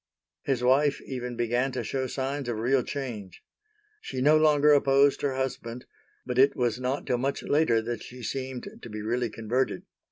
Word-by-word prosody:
His 130 -3 -1
wife 140 +3 +3
even 125 -2 -5
began 120 +3 0
to 130 - -2
show 130 -1 -2
signs 135 0 -3
of 115 - -2
real 125 +4 +2
change. 115 -9 -6 0.6
She 130 - -5
no 150 +4 +5
longer 150 -1 +5
opposed 140 0 +4
her 140 -2 0
husband, 125 -2 -4 0.4
but 125 0 -1
it 135 +2 +5
was 120 -2 0
not 130 +3 -2
till 125 -3 0
much 135 +2 -2
later 120 -7 +2
that 115 -1 -4
she 125 0 -10
seemed 130 +2 -4
to - - -9
be 105 0 -6
really 120 +2 -1
converted. 115 +4 -1
130 Hz, 180 wpm, -27 LUFS, 120-135 Hz, 0.6 s, no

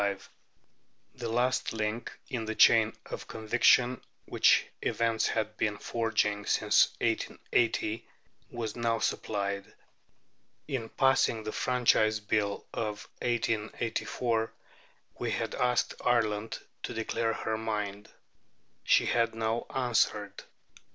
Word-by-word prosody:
The 120 -3 -5
last 125 +2 +1
link 110 +1 -3
in 115 -3 -3
the 110 0 -3
chain 110 0 +6
of - - -7
conviction, 120 +3 +3 0.2
which - - +4 0.2
events 115 -1 +1
had 110 0 -2
been 105 -1 0
forging 105 -3 -1
since - - +4
1880, 115 -1 0 0.4
was 115 -3 -4
now 115 -1 0
supplied. 100 -2 -2 1.0
In 130 -6 -3
passing 135 -4 +2
the 110 - -4
Franchise 110 -4 +2
Bill 105 -1 -1
of 105 -2 -4
1884, 115 0 -1 0.7
we - - -1
had - - -2
asked 125 -1 +1
Ireland 110 -3 +1 0.2
to - - -5
declare 115 0 -1
her 110 0 -2
mind. 105 -2 -3 0.7
She - - +4
had 115 -1 +1
now 115 +1 -1
answered. 110 -5 0
110 Hz, 105 wpm, -30 LUFS, 105-120 Hz, 1.0 s, chain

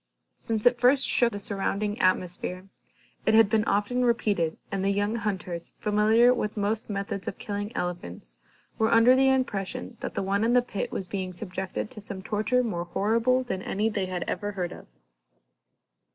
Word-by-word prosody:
Since 220 -2 -3
it 245 0 +4
first 260 +2 +5
shook 240 -1 +6
the 205 - -5
surrounding 205 +1 -2
atmosphere, 185 0 0 0.6
it 220 - +5
had 220 -2 +5
been 220 -1 +2
often 220 +5 0
repeated 205 -9 +1
and 195 -1 -2
the 195 - +2
young 205 +2 0
hunters, 185 -6 -4
familiar 220 +4 +4
with 210 -3 -3
most 210 +2 -1
methods 200 -2 -4
of - - -4
killing 205 +1 -4
elephants, 85 - -5 0.4
were 220 0 +2
under 230 +3 +6
the 265 0 +4
impression 230 -8 -1
that - - -6
the - - -1
one 200 +2 0
in 235 +1 +2
the 250 -1 +4
pit 205 -5 -4
was 190 - -3
being 185 -1 -4
subjected 185 +1 -5
to 210 - -7
some 195 -2 -7
torture 220 +5 0
more 175 -7 -3
horrible 230 +8 +1
than 190 -7 -4
any 210 +4 -1
they 200 -4 -2
had 180 -1 -3
ever 205 0 -4
heard 180 -3 -3
of. - - -11
205 Hz, 180 wpm, -26 LUFS, 190-230 Hz, 0.6 s, shook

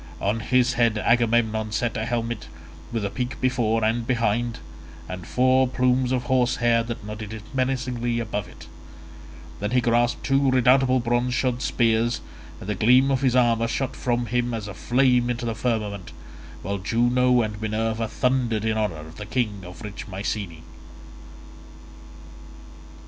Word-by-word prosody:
On 105 +3 0
his 125 +2 +2
head 120 -2 +2
Agamemnon 110 -1 +2
set 115 +1 -1
a 110 - -2
helmet, 120 -2 -3 0.4
with 115 -3 -2
a 100 - -3
peak 125 0 -4
before 115 -3 +1
and 115 +1 0
behind, 115 0 0 0.5
and 90 0 -7
four 130 +1 +3
plumes 125 0 +1
of 125 -1 0
horse 125 0 +2
hair 120 -1 +2
that 115 -2 -6
nodded 105 +1 -6
menacingly 125 -2 -1
above 105 -3 -3
it; - - -13 0.9
then 105 - -2
he 125 +2 +3
grasped 120 0 +1
two 135 0 +2
redoubtable 130 +1 +4
bronze 120 +1 0
shod 125 -1 0
spears, 115 -1 +1 0.4
and - - -9
the 105 - 0
gleam 125 +7 +4
of 135 -1 +1
his 130 -2 +2
armour 115 -2 +3
shot 130 +3 -2
from 120 -1 -1
him 120 +1 -1
as 105 -2 -5
a 105 - -6
flame 125 +2 +2
into 120 0 -2
the 115 - -1
firmament, 105 -5 -3 0.5
while 100 +2 -3
Juno 120 +4 +2
and 105 -1 -5
Minerva 110 +1 -1
thundered 120 -3 0
in 110 0 0
honour 105 -7 -1
of 80 +1 -13
the 105 - -7
king 105 -6 -2
of 90 +6 -10
rich 105 -1 -7
Mycene. 95 -4 -4
120 Hz, 155 wpm, -24 LUFS, 110-125 Hz, 0.9 s, redoubtable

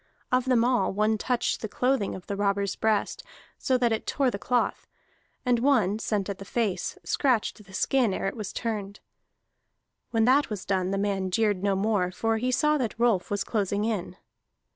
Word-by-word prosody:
Of 255 0 +2
them 250 -3 +3
all, 250 -1 +2
one 215 +2 +1
touched 250 +1 0
the 220 - -3
clothing 250 -1 0
on 185 - -9
the 200 - -3
robber's 200 -1 0
breast, 220 -2 0 0.4
so 260 - +2
that 240 -2 +2
it 225 - -2
tore 270 -3 +1
the 200 - -5
cloth; 245 +2 0 0.6
and 245 -1 +3
one, 230 -6 +2
sent 210 -3 -1
at 200 -2 -5
the - - -7
face, 205 -1 -2
scratched 240 -5 0
the 195 - -17
skin 240 +3 +2
ere 190 - -3
it 195 - -2
was 215 -4 -5
turned. 210 -3 -4 1.1
When 225 -1 +2
that 270 +3 +4
was 210 -4 -5
done, 190 -2 0
the 195 - -1
man 195 -2 -1
jeered 205 -1 +1
no 200 -1 +1
more, 195 -2 +1
for 225 +4 -1
he 250 +3 -1
saw 300 +3 +2
that 235 -4 -2
Rolf 230 -6 +2
was 205 -1 -1
closing 205 -1 -1
in. 200 -5 -3
215 Hz, 190 wpm, -27 LUFS, 200-245 Hz, 1.1 s, that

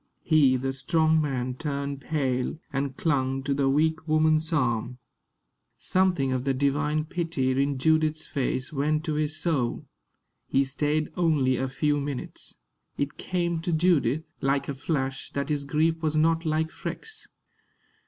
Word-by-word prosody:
He, 145 -5 +4
the 135 +1 -2
strong 160 +3 +2
man, 130 -4 -1
turned 140 0 -4
pale, 135 -3 -1 0.2
and 135 -1 -2
clung 135 -4 0
to 140 +1 0
the 135 -1 +2
weak 160 +3 +1
woman's 155 +1 +3
arm. 125 -4 0 0.8
Something 180 -8 +1
of 130 -1 -1
the 135 0 0
divine 145 +3 +1
pity 165 -6 -1
in 140 0 0
Judith's 155 +2 +2
face 135 0 -2
went 150 +2 +1
to 160 -3 -2
his 155 +1 -1
soul. 145 -8 -1 0.6
He 135 - +3
stayed 150 +3 -1
only 150 -7 +2
a 130 +1 -1
few 145 +3 0
minutes. 140 -2 -5 0.4
It 140 0 -2
came 170 -2 -1
to 175 +1 -2
Judith, 160 -4 +2 0.2
like 135 +1 +1
a 140 - -2
flash, 135 -1 -2
that 140 +2 -2
his 145 -2 -1
grief 160 +3 +1
was 155 -1 0
not 165 +1 +2
like 160 +1 0
Freke's. 445 -1 -6
150 Hz, 150 wpm, -27 LUFS, 135-160 Hz, 0.8 s, He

